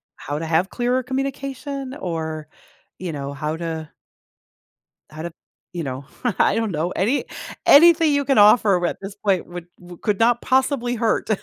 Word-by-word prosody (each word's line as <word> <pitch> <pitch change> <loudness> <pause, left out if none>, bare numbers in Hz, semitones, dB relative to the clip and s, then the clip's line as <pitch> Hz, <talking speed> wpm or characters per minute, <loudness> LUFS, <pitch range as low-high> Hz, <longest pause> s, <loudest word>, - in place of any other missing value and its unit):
how 145 +2 -5
to 165 - -4
have 165 +4 +1
clearer 250 +2 0
communication? 270 +1 -4
Or, 160 - -4 0.5
you 185 -2 -4
know, 140 -2 -5
how 150 +3 -3
to 160 -2 -5 1.2
how 155 +1 -8
to, 170 -1 -6 0.4
you 175 -2 -3
know, 135 0 -5 0.3
I - - +4
don't 225 -3 -1
know, 165 +3 -2
any 220 +11 0 0.4
anything 325 +1 +7
you 285 0 +1
can 275 -1 +2
offer 210 +1 +6
r 175 - -1
at - - -4
this 195 +1 -7
point 195 -4 0
w 175 -1 -8
would 175 -1 -13
could 205 -3 0
not 235 +1 +3
possibly 260 -2 +1
hurt. 225 -1 0
200 Hz, 170 wpm, -22 LUFS, 160-260 Hz, 1.2 s, anything